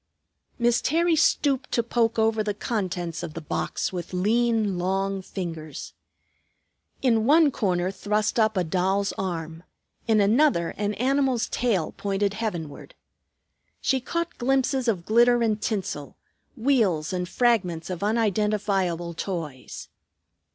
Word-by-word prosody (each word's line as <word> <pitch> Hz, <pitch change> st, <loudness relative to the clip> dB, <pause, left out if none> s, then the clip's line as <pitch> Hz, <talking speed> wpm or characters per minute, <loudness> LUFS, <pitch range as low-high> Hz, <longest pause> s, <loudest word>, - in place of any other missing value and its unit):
Miss 240 Hz, -1 st, +2 dB
Terry 335 Hz, +2 st, +2 dB
stooped 295 Hz, -4 st, +2 dB
to 235 Hz, -, +2 dB
poke 230 Hz, -1 st, 0 dB
over 220 Hz, 0 st, +2 dB
the 210 Hz, -1 st, -2 dB
contents 180 Hz, -7 st, -3 dB
of 170 Hz, -3 st, -7 dB
the -, -, -3 dB
box 160 Hz, +4 st, -3 dB
with 180 Hz, 0 st, -6 dB
lean, 215 Hz, 0 st, +1 dB
long 195 Hz, +2 st, -1 dB
fingers. 165 Hz, -5 st, -6 dB, 1.1 s
In 230 Hz, -3 st, +3 dB
one 305 Hz, 0 st, +5 dB
corner 185 Hz, -6 st, 0 dB
thrust 210 Hz, +3 st, -1 dB
up 220 Hz, -2 st, +2 dB
a 185 Hz, -, +2 dB
doll's 190 Hz, +4 st, 0 dB
arm; 165 Hz, -3 st, -4 dB, 0.5 s
in 220 Hz, -2 st, +4 dB
another, 210 Hz, -, +3 dB
an 205 Hz, 0 st, -3 dB
animal's 260 Hz, +1 st, +1 dB
tail 210 Hz, -10 st, 0 dB
pointed 200 Hz, 0 st, -1 dB
heavenward. 175 Hz, -10 st, -5 dB, 0.8 s
She 265 Hz, -, +1 dB
caught 335 Hz, +6 st, -3 dB
glimpses 265 Hz, 0 st, +1 dB
of 185 Hz, -7 st, 0 dB
glitter 240 Hz, +2 st, +4 dB
and 215 Hz, -2 st, 0 dB
tinsel, 185 Hz, -, -3 dB, 0.4 s
wheels 210 Hz, -, +1 dB
and 180 Hz, -1 st, -2 dB
fragments 185 Hz, -9 st, +1 dB
of 180 Hz, -, -5 dB
unidentifiable 205 Hz, -5 st, 0 dB
toys. 160 Hz, -7 st, -6 dB
210 Hz, 125 wpm, -25 LUFS, 180-235 Hz, 1.1 s, one